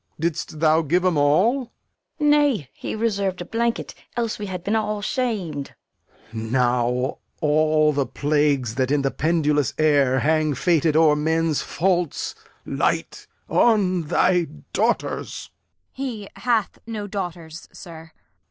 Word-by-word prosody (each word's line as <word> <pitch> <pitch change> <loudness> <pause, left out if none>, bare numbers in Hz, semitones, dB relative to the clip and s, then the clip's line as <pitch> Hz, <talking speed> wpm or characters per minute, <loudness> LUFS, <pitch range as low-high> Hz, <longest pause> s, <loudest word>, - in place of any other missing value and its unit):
Didst 160 -1 -3
thou 160 0 +4
give 175 +4 +1
'em 180 -3 +2
all? 185 - +3 0.5
Fool. 300 - +1
Nay, 285 - +2
he - - -5
reserv'd 200 -4 -1
a 175 - -5
blanket, 235 +2 -2 0.2
else 230 -2 -1
we 205 - -4
had 180 -2 -5
been 210 +4 0
all 210 -1 -1
sham'd. 200 - -2 0.6
Lear. 110 0 -5
Now 125 0 +1 0.2
all 155 0 +3
the 140 -2 0
plagues 145 -3 +1
that 130 - +1
in 145 -1 +1
the 135 - +1
pendulous 150 -3 +1
air 145 -4 +3
Hang 155 -1 +1
fated 160 +1 +2
o'er 155 -2 +5
men's 160 0 0
faults 175 -3 -1 0.3
light - - -2 0.2
on 195 -6 +3
thy 180 +2 +3 0.3
daughters! - - -1 0.4
Kent. 275 +1 -3
He 215 -5 -6
hath 235 -4 0
no 215 -3 -4
daughters, 175 -5 -6
sir. 165 -2 -11
Lear. - - -40
165 Hz, 140 wpm, -23 LUFS, 145-205 Hz, 0.6 s, o'er